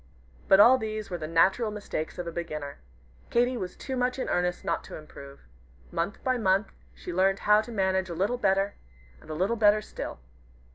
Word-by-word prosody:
But 195 - +6
all 250 +5 +8
these 215 -2 -5
were 175 - -3
but 155 - -4
the - - -10
natural 190 +7 +3
mistakes 205 -7 -5
of 180 - -4
a 170 - -4
beginner. 155 -4 -5 0.5
Katy 245 +2 +2
was 185 -6 -5
too 265 - -5
much 250 +1 0
in 260 - -3
earnest 180 0 -1
not 170 - -1
to - - -9
improve. 140 -2 -12 0.5
Month 170 +5 -3
by 255 -1 +1
month 195 -1 +2 0.2
she 180 - -7
learned 190 +2 +3
how 210 +1 +4
to 220 - -9
manage 190 -3 0
a 170 - -5
little 205 +8 0
better, 195 -1 +2 0.5
and - - -17
a 155 - -4
little 195 +8 0
better 210 -1 +5
still. 210 - -7
195 Hz, 200 wpm, -28 LUFS, 170-220 Hz, 0.5 s, all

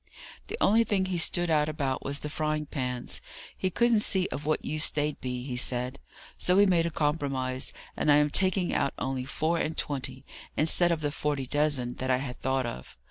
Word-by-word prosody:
The - - -5
only 225 +3 +5
thing 200 -4 0
he 185 -2 -2
stood 175 +1 +2
out 150 -1 +3
about 140 -4 -2
was 140 +1 0
the 150 - -5
frying 155 0 -1
pans. 125 -4 -4 0.3
He 185 - -1
couldn't 235 +3 +3
see 190 -3 +2
of 150 - -5
what 155 - 0
use 155 +1 +3
they'd 150 -1 -2
be, 125 -1 -3
he 130 -1 -4
said. 125 +1 -1 0.4
So 180 - +3
we 205 - +7
made 170 -3 +3
a - - -1
compromise, 140 -5 -1 0.2
and 150 - +2
I - - +7
am 150 0 +3
taking 185 0 +2
out 140 - 0
only 130 -1 -2
four 160 +5 0
and 160 0 -2
twenty, 135 -2 -2 0.3
instead 170 +3 +4
of 165 -2 0
the 145 -1 -1
forty 145 -2 -2
dozen 140 -3 +1
that 130 - -3
I 130 - +4
had 125 -1 -6
thought 130 0 0
of. 65 - -7
150 Hz, 205 wpm, -28 LUFS, 130-165 Hz, 0.4 s, we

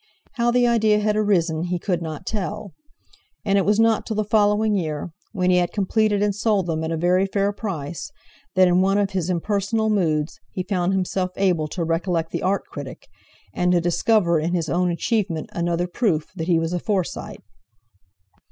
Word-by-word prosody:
How 240 -3 0
the 245 0 +3
idea 220 -3 +3
had 210 0 +1
arisen 175 -6 +1
he 180 0 -1
could 175 -1 -2
not 160 -3 -6
tell; 205 -1 -4 0.7
and 200 -1 +3
it 195 - 0
was 210 +1 +2
not 225 -1 +3
till 220 - -4
the 215 - +1
following 210 0 +2
year, 160 -3 -2 0.2
when 185 -3 +1
he 180 - +4
had 175 -1 +1
completed 205 0 +1
and 205 -1 +1
sold 205 -2 +1
them 160 -2 -2
at 160 - -2
a 165 - -1
very 180 +3 +2
fair 200 +1 0
price, 175 - -5 0.5
that 185 0 +6
in 180 +1 +3
one 195 +1 +2
of 200 -1 +1
his 185 -2 -2
impersonal 205 +4 0
moods, 160 -6 0
he 185 - -2
found 185 -1 0
himself 185 0 -1
able 180 -6 +1
to 170 +3 -4
recollect 165 0 -1
the - - -3
Art 195 +1 0
critic, 140 -3 -9 0.4
and 180 0 +1
to 175 - +4
discover 175 0 +2
in 170 +3 -1
his 165 -2 -1
own 180 +1 +1
achievement 175 -2 -1
another 170 0 0
proof 175 -4 -1
that 165 -2 -4
he 175 -2 +3
was 165 +1 -1
a 175 - 0
Forsyte. 190 -2 -3
185 Hz, 190 wpm, -22 LUFS, 170-210 Hz, 0.7 s, that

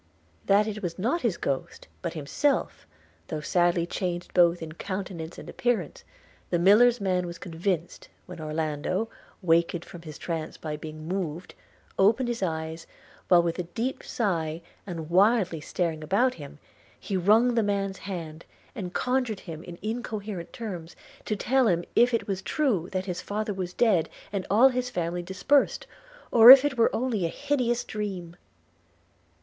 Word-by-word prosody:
That 205 +1 +5
it 215 -1 -4
was 175 -4 -4
not 245 - 0
his 220 -8 0
ghost, 135 -1 -4
but 170 -2 -3
himself, 155 - -1 0.4
though 155 - -3
sadly 175 +2 +2
changed 175 0 -4
both 170 -1 +4
in 160 - -7
countenance 180 -1 -6
and - - -10
appearance, 230 -10 -2 0.5
the 175 - +1
miller's 220 +7 +5
man 185 -3 0
was 170 0 -7
convinced, 175 0 -3 0.2
when 180 -2 -10
Orlando, 155 +6 -2 0.3
awakened 170 0 +2
from 175 - -11
his 155 -3 -9
trance 165 -2 -4
by 155 -1 -5
being 155 +1 -8
moved, 180 -2 -4 0.5
opened 225 +6 +4
his 235 -3 -3
eyes, 160 -2 -3 0.4
while 175 -2 +6
with 170 +1 -2
a 175 -1 -4
deep 250 +4 -2
sigh, 165 -7 -2 0.2
and 165 -3 -6
wildly 190 -3 +3
staring 160 0 -2
about 220 +10 +2
him, 145 - -10 0.4
he 195 - -4
wrung 215 +7 +4
the 230 - +3
man's 200 -2 -1
hand, 165 -5 -6 0.3
and 185 -7 -6
conjured 250 -5 0
him, 165 -2 -8
in 175 -2 -9
incoherent 215 -5 -4
terms, 180 -8 -7 0.3
to 215 - -1
tell 255 +4 +2
him 175 -3 +2
if 240 +1 +5
it 230 - -1
was 195 -2 -2
true 210 - 0
that 185 -1 -2
his 180 -2 -4
father 210 0 -3
was 185 -2 -4
dead, 185 -7 +2 0.2
and 195 -2 -3
all 230 +7 +6
his 250 -1 -2
family 175 -5 -2
dispersed 190 +11 +1 0.2
– - - -23
or 230 0 +9
if 270 +1 +11
it 290 -2 0
were 230 -1 +4
only 230 -6 -1
a - - +2
hideous 245 - 0
dream. 195 -7 -5
185 Hz, 165 wpm, -27 LUFS, 170-225 Hz, 0.5 s, if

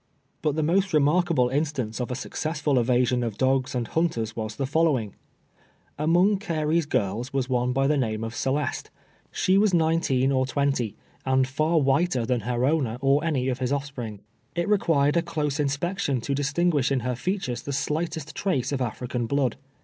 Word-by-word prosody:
But 150 -2 0
the 155 - 0
most 190 +4 +1
remarkable 150 -3 +3
instance 135 -5 -2
of 125 - -3
a 125 - -2
successful 150 0 -1
evasion 125 +1 +2
of 115 -4 -3
dogs 130 +1 +1
and 120 -2 -1
hunters 120 -10 -1
was 110 -1 -4
the 135 - -2
following: 135 - +1 0.9
Among 175 +6 +3
Carey's 160 -3 0
girls 115 +2 -1
was 135 -2 -1
one 125 0 +1
by 135 +2 +1
the 150 +1 +2
name 110 -4 -1
of 115 0 -4
Celeste. 135 +2 -2 0.4
She 190 +1 +2
was 205 -3 +3
nineteen 160 -5 +2
or 130 -1 +1
twenty, 135 -5 0 0.3
and 130 0 +2
far 155 +5 +1
whiter 135 -2 +2
than 125 0 0
her 120 +3 -1
owner, 135 -6 +1
or 140 +2 +2
any 140 -6 0
of 130 -1 -1
his 130 0 -1
offspring. 135 -7 -4 0.3
It 170 0 -1
required 165 -7 +2
a - - +4
close 150 -3 -2
inspection 145 0 -1
to 140 - -2
distinguish 145 0 +1
in 135 -2 +1
her 125 +1 -2
features 155 - -2
the 140 - -5
slightest 155 +2 -2
trace 135 -10 -1
of 135 -2 -1
African 125 0 -3
blood. 135 -2 +1
140 Hz, 175 wpm, -25 LUFS, 125-160 Hz, 0.9 s, a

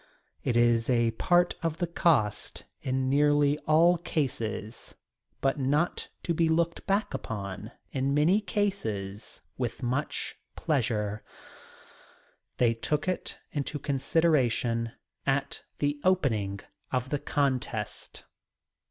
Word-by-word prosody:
It 120 - +1
is 120 0 +3
a 120 -2 +3
part 175 +10 +3
of 165 -2 -1
the 175 - 0
cost 150 -11 +1 0.2
in 130 0 0
nearly 145 +1 +3
all 170 +3 +5
cases 115 -8 -3 0.5
but 135 +1 +1
not 145 +6 0
to 170 - 0
be 165 0 +2
looked 170 +2 0
back 200 -2 +1
upon 105 -4 -5 0.2
in 135 +1 0
many 170 +8 +4
cases 145 - -3 0.2
with 120 +1 -3
much 130 +4 -1 0.2
pleasure. 110 -7 0 1.4
They 120 -2 +4
took 150 +8 -1
it 185 - -2
into 145 +1 -2
consideration 130 -5 +1 0.3
at 135 0 0 0.2
the 145 0 0
opening 110 - +1 0.3
of 130 0 -1
the 145 - 0
contest. 125 -8 -2
135 Hz, 110 wpm, -29 LUFS, 115-160 Hz, 1.4 s, all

